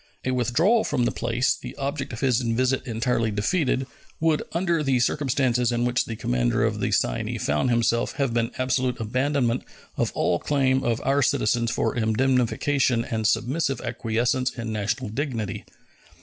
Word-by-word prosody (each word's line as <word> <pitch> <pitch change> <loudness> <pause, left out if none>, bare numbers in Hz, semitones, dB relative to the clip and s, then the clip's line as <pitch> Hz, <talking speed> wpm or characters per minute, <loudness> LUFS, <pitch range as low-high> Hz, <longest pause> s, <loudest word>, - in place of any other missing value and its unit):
A 130 - +1
withdrawal 130 - +2
from 120 - 0
the - - +1
place, 120 +2 0
the - - -9
object 140 0 -3
of 115 - -7
his 130 -3 +2
visit 125 +3 0
entirely 115 0 0
defeated, 130 - 0 0.3
would 160 -1 +2
under 170 -1 0
the 135 -4 +1
circumstances 125 -2 +1
in 120 0 0
which 125 0 +1
the 115 - -5
commander - - 0
of - - 0
the - - -1
Cyane - - 0
found 75 +10 0
himself 115 0 +1
have 135 -4 -1
been 115 0 +1
absolute 130 -1 0
abandonment 125 +2 0 0.3
of - - 0
all 85 -1 +1
claim 135 -2 +1
of 115 -1 0
our 140 +1 +2
citizens 115 -2 +1
for - - -1
indemnification 125 +2 +1
and 110 -2 -1
submissive 135 +5 0
acquiescence 120 +1 0
in 115 -2 -4
national 105 0 -2
indignity. 115 -5 -3
125 Hz, 160 wpm, -24 LUFS, 115-135 Hz, 0.3 s, withdrawal